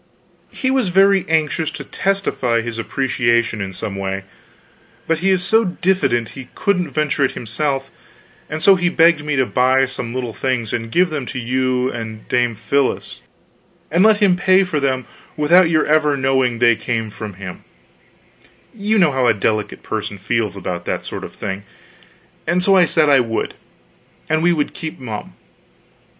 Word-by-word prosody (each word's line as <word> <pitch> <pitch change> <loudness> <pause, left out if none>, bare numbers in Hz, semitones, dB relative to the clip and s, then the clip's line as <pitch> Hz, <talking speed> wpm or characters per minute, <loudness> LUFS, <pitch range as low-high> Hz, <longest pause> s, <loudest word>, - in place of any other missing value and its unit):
He 260 - -2
was 260 -7 +1
very 195 +1 +4
anxious 160 0 +1
to 160 - -8
testify 175 -12 -1
his 115 0 -5
appreciation 120 -2 0
in 95 -1 -4
some 100 +2 -5
way, 95 0 -3 0.8
but 165 -1 0
he 190 +3 +1
is 185 -2 +2
so 220 +5 +3
diffident 175 - 0
he 130 -2 -10
couldn't 180 -5 0
venture 145 0 0
it 135 - +1
himself, 135 +4 -3 0.6
and 155 +1 -4
so 195 - +8
he 175 -2 +1
begged 165 -3 +4
me 150 -1 -1
to 130 -1 +2
buy 130 +2 +3
some 125 -3 -6
little 125 -3 -3
things 120 -1 -2
and 115 -1 -3
give 180 +3 +2
them 145 -5 -4
to - - -6
you 130 +1 0
and 110 -2 -7
Dame 120 -2 +1
Phyllis 140 +5 -1 0.7
and 175 +4 +3
let 215 -1 +5
him 200 -3 +3
pay 185 +2 +4
for 180 -5 -2
them 130 -2 -1 0.3
without 165 +4 +5
your 155 -2 +2
ever 150 -2 +2
knowing 130 -2 +1
they 120 -1 +4
came 115 -1 -3
from 105 -2 -8
him 95 -1 -9 1.1
you 215 0 0
know 170 -7 +4
how 130 -2 +1
a 115 - +4
delicate 105 +1 -2
person 105 -2 -4
feels 105 +2 -1
about 90 -2 -5
that - - -3
sort - - -6
of - - -9
thing 95 +1 -5 0.9
and 180 +1 +1
so 195 +1 +4
I 180 -2 +6
said 155 -2 +3
I 140 -2 +5
would, 115 -2 -2 0.7
and 155 0 +1
we 175 +1 +3
would 150 -4 -1
keep 160 -1 -6
mum. 110 -5 -7
135 Hz, 175 wpm, -19 LUFS, 115-175 Hz, 1.1 s, so